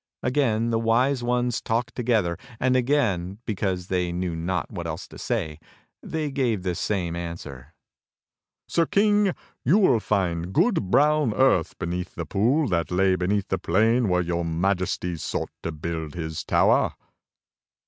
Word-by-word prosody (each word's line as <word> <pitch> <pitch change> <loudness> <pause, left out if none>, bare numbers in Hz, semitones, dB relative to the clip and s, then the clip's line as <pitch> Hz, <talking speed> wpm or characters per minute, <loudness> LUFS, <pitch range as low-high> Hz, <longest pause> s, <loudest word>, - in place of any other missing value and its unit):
Again 120 -4 +1
the 115 - +1
Wise 120 +4 +2
Ones 120 0 0
talked 115 +1 -1
together; 110 -8 +1 0.2
and 130 0 +2
again 115 -9 +1
because 95 -4 -2
they 90 -1 -1
knew 90 -1 -2
not 85 +1 -2
what - - -5
else - - -5
to - - -12
say, 75 -1 -2 0.4
they 155 -2 -3
gave 120 -8 0
the 90 -1 -1
same 85 -1 -2
answer: 80 -5 -7 0.9
"Sir 165 -2 +1
King, 205 -2 +3 0.3
you 160 +11 +4
will 160 - +4
find 90 -4 -1
good, 190 - +2
brown 150 -3 +3
earth 130 -11 +2
beneath 90 +2 -4
the - - -4
pool 130 +10 +2
that 85 -4 0
lay 95 +1 +3
beneath 95 +2 -1
the 95 - 0
plain 110 +6 +2
where 90 0 +2
your 85 0 -1
Majesty 90 +1 -1
sought - - -3
to 85 - -3
build 80 0 -5
his 80 -2 -4
tower." - - +3
95 Hz, 150 wpm, -25 LUFS, 85-125 Hz, 0.9 s, you